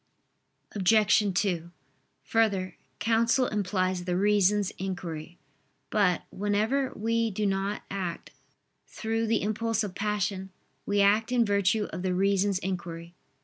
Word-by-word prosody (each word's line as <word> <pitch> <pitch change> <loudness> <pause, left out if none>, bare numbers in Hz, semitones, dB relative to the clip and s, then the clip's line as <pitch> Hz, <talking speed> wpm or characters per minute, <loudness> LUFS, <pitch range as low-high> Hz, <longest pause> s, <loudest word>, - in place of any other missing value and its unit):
Obj. 210 +1 +3
2: 175 -4 -2 0.5
Further, 195 +3 +1 0.2
counsel 230 +3 +2
implies 185 -3 -1
the 180 -1 0
reason's 205 0 +3
inquiry. 175 -3 -5 0.5
But, 195 -5 +2
whenever 215 +7 0
we 230 +1 0
do 210 +1 -2
not 195 +1 -1
act 185 -4 -4 0.6
through 225 0 -2
the 225 -2 +1
impulse 225 +1 0
of 200 -3 -5
passion, 200 -1 -2 0.4
we 205 0 +2
act 210 +4 +3
in 240 -2 +3
virtue 200 +1 +2
of - - -4
the 185 -1 -1
reason's 195 +1 +2
inquiry. 170 -2 -5
200 Hz, 120 wpm, -28 LUFS, 185-215 Hz, 0.6 s, Obj